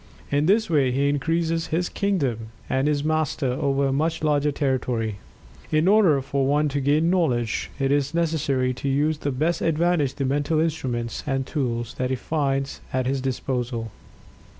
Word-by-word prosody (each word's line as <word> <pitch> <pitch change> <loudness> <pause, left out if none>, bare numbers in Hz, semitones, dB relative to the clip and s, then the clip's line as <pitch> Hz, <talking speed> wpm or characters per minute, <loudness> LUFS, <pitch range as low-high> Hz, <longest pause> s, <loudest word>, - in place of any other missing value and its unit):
In 145 +2 +2
this 215 +3 +3
way 145 -6 +2
he 140 +3 +1
increases 165 +3 0
his 175 +2 0
kingdom 140 - -1 0.2
and 135 +2 +1
is 145 -1 0
Master 155 -3 0
over 140 +1 0
a 135 - +1
much 160 +3 -1
larger 150 -1 +2
territory. 125 -6 -1 0.5
In 155 +2 +3
order 195 -8 +5
for 135 0 0
one 150 +2 +2
to 140 0 -2
gain 150 +5 +2
knowledge, 125 -11 0
it 135 -1 0
is 140 -1 +1
necessary 150 -6 0
to 135 +2 -3
use 150 +3 +1
to - - -16
the 145 - +1
best 155 +6 0
advantage 165 -4 +1
the 140 - -2
mental 145 +4 +1
instruments 130 -8 -2
and 135 -2 0
tools 120 -6 -2
that 130 0 0
he 130 - 0
finds 135 0 -2
at 130 -1 0
his 135 +1 0
disposal. 125 -3 -3
140 Hz, 175 wpm, -24 LUFS, 130-155 Hz, 0.5 s, order